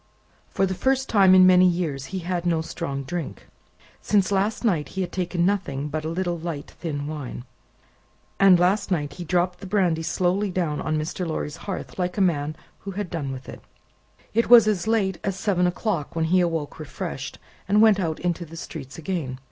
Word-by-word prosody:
For 195 - +1
the 190 - -2
first 265 +6 0
time 195 -3 +6
in 185 0 +8
many 185 0 +7
years, 165 -7 -1
he 190 - -5
had 175 -1 -1
no 170 -2 +1
strong 140 -4 -4
drink. 165 +3 -5 0.6
Since 200 -2 +2
last 200 +4 0
night 170 -9 +1
he - - +1
had 180 - -3
taken 180 -1 -1
nothing 150 -8 -1
but 155 +1 -3
a 160 - -3
little 175 0 -2
light 160 -3 -5
thin 145 -4 -3
wine, 145 -5 -6 1.0
and 195 -2 +7
last 185 +4 +2
night 145 -6 -1
he 175 - -7
had - - -17
dropped 180 +1 +1
the 195 - -8
brandy 180 -5 +1
slowly 185 +5 0
down 175 -5 -1
on 155 - -1
Mr. 170 +3 -3
Lorry's 150 -2 -3
hearth 195 - -5
like 180 +1 -1
a - - 0
man 155 -5 +1 0.2
who 200 - -8
had 200 -2 -4
done 145 -5 -3
with 130 -1 -8
it. - - -9 0.7
It 230 +1 +1
was 235 -3 +9
as 205 -2 0
late 195 -5 +1
as 195 -2 -1
seven 185 -3 +1
o'clock 175 -4 -2
when 165 -1 +1
he 180 +3 +3
awoke 165 -4 -2
refreshed, 155 - -6 0.3
and 205 +2 +3
went 215 -2 +6
out 165 -4 -2
into 175 0 -1
the 165 0 -11
streets 140 -5 -8
again. 160 -6 -3
175 Hz, 200 wpm, -24 LUFS, 155-190 Hz, 1.0 s, was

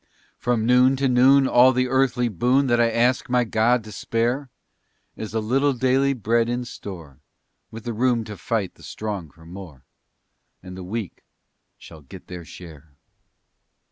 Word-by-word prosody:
From 120 -3 0
noon 125 +2 +4
to 135 +1 0
noon 130 +2 +5
all 130 +1 +5
the 125 0 +1
earthly 125 -1 +1
boon 125 +7 +1
That 120 -2 +2
I 115 - +3
ask 120 +3 +1
my 125 0 +2
God 115 +1 +1
to 105 - -11
spare 120 +6 -2 0.7
Is 110 0 -7
a - - +2
little 135 +6 +1
daily 130 +2 +1
bread 115 -1 0
in 120 0 -2
store, 85 - -10 0.5
With 115 0 -10
the 120 - -4
room 120 0 +1
to 105 -1 -8
fight 100 0 -3
the - - -22
strong 100 -7 -6
for 80 +4 -19
more, 85 -7 -11 0.8
And 90 0 -9
the 95 - -8
weak 105 +1 -6 0.5
shall 80 - -14
get 70 - -13
their 90 -2 -9
share. 80 -4 -13
115 Hz, 165 wpm, -23 LUFS, 100-125 Hz, 0.8 s, noon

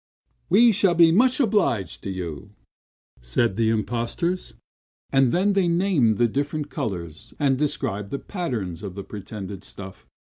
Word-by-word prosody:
"We 230 +6 +6
shall 190 -3 +3
be 165 -1 +6
much 255 - +3
obliged 200 - +1
to - - -5
you," 90 -6 -6 0.7
said 75 - 0
the 110 0 +2
impostors, 120 - -2 0.6
and 135 -3 +4
then 195 +3 +2
they 195 -3 +2
named 170 - +2
the 120 - +4
different 145 +4 -3
colors 90 -2 -5
and 140 -3 +2
described 105 -8 -2
the 140 - -3
pattern 125 - -4
of 100 -3 -7
the 100 - -6
pretended 100 -1 -8
stuff. 95 -1 -10
120 Hz, 145 wpm, -24 LUFS, -, 0.7 s, We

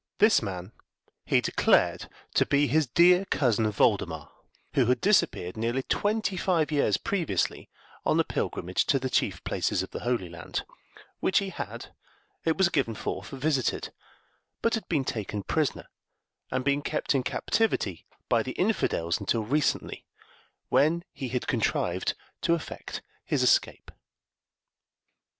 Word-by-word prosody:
This 215 +1 +5
man 95 -2 -5 0.5
he - - +3
declared - - +2 0.2
to - - +4
be 145 +1 +3
his 155 0 +2
dear 180 +8 +5
cousin 115 - +1
Voldemar, 100 - +1 0.4
who 130 -4 +3
had 125 - +3
disappeared 185 - +2
nearly 120 +4 -1
twenty 205 +1 0
five 165 -5 +1
years 140 -9 +2
previously, 190 -6 -1 0.3
on - - +2
a - - +5
pilgrimage 90 +2 -2
to 140 - +4
the 130 -1 -3
chief - - 0
places - - 0
of - - -9
the - - -5
Holy 120 -7 -1
Land; 85 -1 -5 0.5
which 190 - +2
he 200 -1 +1
had, 190 - -7 0.5
it 160 -1 +2
was 190 -2 +4
given 130 -9 0
forth, - - -4
visited, 135 -1 -1 0.7
but 230 - +2
had 225 - -2
been 145 -6 +1
taken 105 -4 -3
prisoner 155 +3 -1 0.6
and 130 - -2
been 140 +1 +2
kept 150 +1 -1
in 135 - +2
captivity 125 - -1 0.2
by - - +3
the - - -4
infidels 85 +1 0
until 115 -2 0
recently, 140 +5 -1 0.6
when 165 +4 +3
he 135 - -5
had 125 0 -2
contrived - - 0 0.3
to 170 - +3
effect 165 - -7 0.2
his - - 0
escape. - - +2
140 Hz, 140 wpm, -27 LUFS, 115-170 Hz, 0.7 s, This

